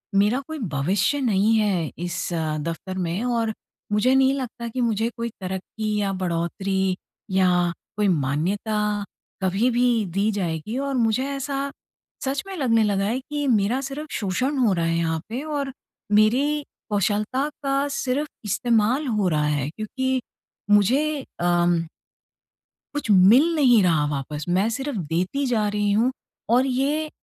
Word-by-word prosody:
मेरा 210 +6 +3
कोई 315 -1 -5 0.2
भविष्य 195 - +1
नहीं 215 -2 +3
है 190 -7 0
इस 175 +1 -3
दफ़्तर 165 +3 -3
में। 180 +3 -1
और 230 -3 0 0.4
मुझे 210 +5 +3
नहीं 265 0 +4
लगता 245 -3 -4
कि 250 +2 -3
मुझे 225 -1 +1
कोई 235 0 -2
तरक्की 195 +3 -3
या 200 -1 0
बढ़ोतरी 185 +2 0 0.4
या 190 -1 +4 0.5
कोई 210 -1 +2
मान्यता 200 +7 0 0.4
कभी 195 +6 +2
भी 240 -2 +2
दी 200 +4 +1
जाएगी। 185 +3 -3
और 275 0 -2
मुझे 230 +2 +2
ऐसा 275 0 -3 0.5
सच 270 +1 -1
में 390 - -6
लगने 230 -6 +3
लगा 200 -2 +1
है 230 +5 0
कि 290 +2 -4
मेरा 235 +2 +2
सिर्फ़ 280 +3 -5
शोषण 250 +9 -1
हो 235 -7 +3
रहा 170 -2 0
है 165 0 +1
यहाँ 160 -1 0
पे 245 +4 -3
और 285 -3 -3 0.5
मेरी 285 +7 +2 0.3
कौशलता 210 +6 0 0.2
का 275 +1 +1
सिर्फ़ 275 +4 -1 0.2
इस्तेमाल 235 +6 +1
हो 210 -5 +1
रहा 150 -2 +1
है। 145 -2 0
क्योंकि 260 - -2 0.5
मुझे 270 +9 +3 0.2
अम 175 0 +3 1.2
कुछ 290 -6 -3
मिल 225 - +6
नहीं 250 -8 +5
रहा 160 -4 +3
वापस 145 +1 -4
मैं 190 +5 +2
सिर्फ़ 265 +2 -3
देती 180 - -1
जा 225 -4 +1
रही 205 0 0
हूँ 225 +5 +3 0.4
और 250 +3 +4
ये 285 +4 0
215 Hz, 150 wpm, -24 LUFS, 185-260 Hz, 1.2 s, मिल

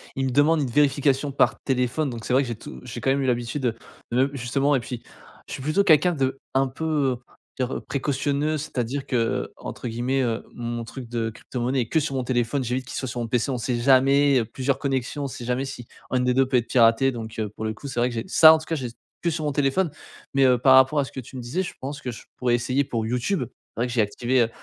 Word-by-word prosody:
ils 135 - -1
me 130 - -1
demandent 150 +4 +4
une 135 - -1
vérification 140 +1 +2
par 135 - +2
téléphone 130 +3 0
donc 115 -3 -7
c'est - - -1
vrai 130 - +5
que - - -5
j'ai 120 - -3
tout 65 - -10
j'ai - - -7
quand 135 - +2
même 140 +1 +1
eu 135 - 0
l'habitude 120 +3 -1
de, 120 -3 +1 0.4
même, 130 +2 +3
justement 135 +2 +1
et - - +2
puis 120 0 -7 0.4
je - - -7
suis - - -5
plutôt 155 +8 +2
quelqu'un 175 0 +5
de 135 -3 -1
un 135 0 +3
peu, 130 +5 -7
heu, 145 -5 +1 0.4
on 130 - +2
va 125 - -5
dire - - -4
précautionneux. 145 +2 -1
C'est-à-dire 135 -2 -3
que, 130 - -3
heu, 115 -1 0
entre - - -6
guillemets, 125 +4 0
heu, 115 -2 -1
mon 120 0 -4
truc 120 +1 -9
de 115 -1 -1
crypto 120 +3 -7
monnaie 130 +2 +1
est 115 - -4
que 160 - +3
sur 145 -2 -2
mon 130 - -1
téléphone, 125 +2 0
«j'évite» 125 +2 -2
qu'il - - -7
soit 130 - -3
sur 120 - -4
mon 120 - -2
PC. 120 +3 0
On 130 - -1
sait 120 +1 -1
jamais, 135 +2 +5
heu, 115 - -1
plusieurs 130 +4 -1
connexions, 135 +1 -2
on - - -1
sait 125 - -8
jamais 125 +2 -1
si 125 -3 -8 0.2
1 125 0 +2
des 125 0 +2
2 135 +1 +4
peut 130 - +2
être 120 - -1
piraté 115 +2 +4
donc 115 -2 -7
heu, 110 -1 -1
pour 110 - -5
le 110 - -1
coup, 140 +6 -9
c'est 125 - -3
vrai 120 +1 +2
que 120 - -7
j'ai 115 - -2
ce - - -3
ça, 160 -1 +11
en - - +4
tout 155 - -8
cas, 165 - -2
j'ai 130 -5 -4 0.3
que 170 - +2
sur 160 -1 -2
mon 150 - 0
téléphone 145 +5 +1 0.4
mais 135 -1 +4
heu, 125 -1 +5
par 130 +2 +6
rapport 130 +3 +5
à 140 - +1
ce - - -11
que - - -6
tu 130 +2 -11
me - - -5
disais, 125 +10 -2
je 175 - -6
pense 140 +2 -6
que 125 - -4
je 115 - -10
pourrais 125 -1 +2
essayer 130 +4 +1
pour 115 -4 -3
YouTube. 125 - 0 0.3
C'est - - -7
vrai 125 - +1
que 120 - -5
j'ai 115 - +3
activé, 120 +5 +1
heu, 115 - -1
130 Hz, 285 wpm, -24 LUFS, 120-140 Hz, 0.4 s, ça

